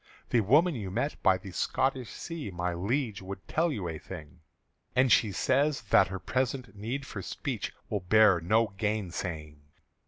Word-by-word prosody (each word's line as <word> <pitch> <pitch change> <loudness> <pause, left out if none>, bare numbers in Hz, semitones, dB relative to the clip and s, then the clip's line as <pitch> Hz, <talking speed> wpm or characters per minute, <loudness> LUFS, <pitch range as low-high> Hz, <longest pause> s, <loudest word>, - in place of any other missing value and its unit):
"The 120 - +4
woman 150 - +4
you 105 -8 -4
met 120 +10 -2
by 95 -1 +4
the 95 +1 -10
Scotish 130 +5 0
Sea, 165 - -6
My 90 -1 -2
Liege, 105 +4 -1
would 95 +1 -8
tell 165 +1 +1
you 100 -10 -3
a 80 -2 -5
thing; 85 -2 -10 0.6
And 130 -1 +4
she 110 -1 +5
says 140 +7 +1
that - - +6
her 95 - -4
present 125 +4 -2
need 120 +7 -4
for 100 - -6
speech - - -4 0.2
Will 105 - -1
bear 100 0 +5
no 110 +6 +3
gainsaying." 85 -8 -3
105 Hz, 165 wpm, -29 LUFS, 90-130 Hz, 0.6 s, that